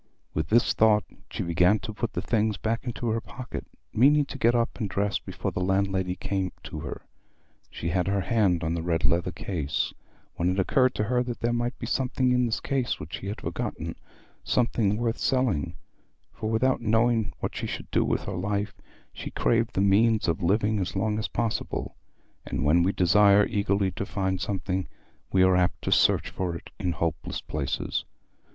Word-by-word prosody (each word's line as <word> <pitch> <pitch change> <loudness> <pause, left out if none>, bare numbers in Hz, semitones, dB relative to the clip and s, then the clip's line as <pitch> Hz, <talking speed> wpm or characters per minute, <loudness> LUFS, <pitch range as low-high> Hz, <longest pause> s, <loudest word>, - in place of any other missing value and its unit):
With 80 - -1
this 115 +2 +4
thought 105 -1 +4 0.3
she - - -3
began 90 +4 +3
to 110 +3 -5
put 115 +2 -3
the - - -2
things 110 -3 +1
back 115 +7 -2
into 120 -1 -3
her 115 +1 0
pocket, 125 +4 -7 0.3
meaning 145 +5 +5
to 135 - -8
get 120 0 +4
up 120 +1 0
and 105 -4 -2
dress 100 0 0
before - - -4
the - - -3
landlady 95 -1 +1
came 95 -2 -2
to - - -6
her. - - -6 0.7
She 85 - -4
had 90 +1 0
her 100 0 +1
hand 95 -6 +2
on 80 +1 0
the 85 - -2
red 85 -1 0
leather 85 +1 +2
case, 80 -4 -2 0.4
when 85 +1 +1
it 90 - 0
occurred 130 +6 +3
to - - 0
her 125 +3 +1
that 120 -1 -4
there 120 0 +1
might 120 +1 -1
be - - -5
something 130 -1 +1
in 125 -1 +3
this 110 - -1
case 130 -3 -1
which 75 +2 -8
she 95 - -7
had 105 - -5
forgotten—something 110 -4 -2
worth 115 0 -1
selling; 125 - +1 0.6
for 110 - -4
without 125 +4 +2
knowing 115 -1 +2
what - - -3
she - - -3
should - - -6
do - - +3
with - - 0
her - - -4
life, 100 +3 -2 0.4
she - - -6
craved 115 -1 +1
the 95 - +2
means 105 +2 +4
of 85 -1 0
living 105 +4 +2
as 95 0 -3
long 105 +2 0
as 110 - -1
possible; 115 -2 -2 0.5
and - - -3
when 80 +4 +5
we 90 +3 +3
desire 100 +2 +5
eagerly 100 -1 +1
to 100 - -4
find 95 -2 -1
something, 95 -2 -2 0.4
we 95 -1 +4
are 95 0 +5
apt 90 -1 +2
to - - -1
search - - +3
for 90 -2 -2
it - - -10
in 90 -3 0
hopeless 80 +1 -2
places. 75 -3 -2
100 Hz, 190 wpm, -27 LUFS, 90-115 Hz, 0.7 s, meaning